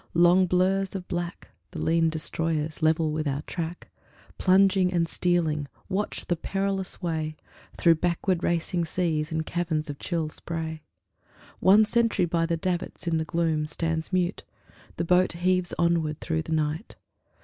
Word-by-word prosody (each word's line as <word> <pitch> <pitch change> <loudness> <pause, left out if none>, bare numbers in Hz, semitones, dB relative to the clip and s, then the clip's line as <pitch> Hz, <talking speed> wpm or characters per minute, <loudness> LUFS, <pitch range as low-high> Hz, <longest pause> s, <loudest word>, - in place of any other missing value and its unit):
Long 175 +2 +5
blurs 190 +2 +1
of 185 -2 -5
black, 175 0 -4 0.2
The - - -7
lean 165 0 +2
Destroyers, 160 0 -2
level 160 0 +2
with 155 0 -2
our 140 +1 -2
track, 170 0 -5 0.5
Plunging 190 -1 +4
and 170 -2 +1
stealing, 165 -5 0 0.2
watch 200 +3 -1
the 175 - 0
perilous 195 +2 -3
way 160 -2 -2 0.4
Through 170 - +5
backward 175 0 0
racing 170 +1 0
seas 160 -2 -1
and 160 0 -1
caverns 160 -3 -1
of 140 - -11
chill 165 -3 -2
spray. 160 0 -5 0.8
One 205 +3 +6
sentry 230 -4 +2
by 165 -1 0
the 170 -1 0
davits, 180 +2 -3
in 165 -1 +1
the 160 - -1
gloom 160 -2 0
Stands 165 +1 -2
mute; 180 0 0 0.5
the 170 - -1
boat 180 +1 +3
heaves 180 +1 +1
onward 165 -3 +1
through 160 -1 -1
the 160 - -8
night. 155 +5 -2
170 Hz, 150 wpm, -26 LUFS, 160-180 Hz, 0.8 s, One